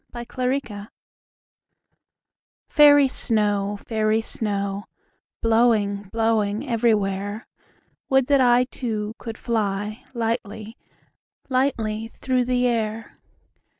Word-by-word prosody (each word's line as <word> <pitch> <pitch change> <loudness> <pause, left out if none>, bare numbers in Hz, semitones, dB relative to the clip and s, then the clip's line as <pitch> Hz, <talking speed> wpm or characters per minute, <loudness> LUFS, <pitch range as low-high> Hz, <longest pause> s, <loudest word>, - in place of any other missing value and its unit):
Snow 240 - -5 0.4
Song 210 -6 -10 1.8
FAIRY 290 -2 +7
snow, 205 -5 0
fairy 220 +1 0
snow, 200 -3 -2 0.6
Blowing, 220 -4 +2
blowing 225 +1 0
everywhere, 210 -3 0 0.6
Would 265 -1 +4
that 280 0 +3
I 245 0 +5
Too, 220 -4 -4
could 225 -2 -7
fly 210 -1 -2
Lightly, 225 -1 -3 0.7
lightly 225 -5 0
through 255 +2 -1
the 250 0 +1
air. 225 -2 -2
225 Hz, 85 wpm, -23 LUFS, 210-245 Hz, 1.8 s, FAIRY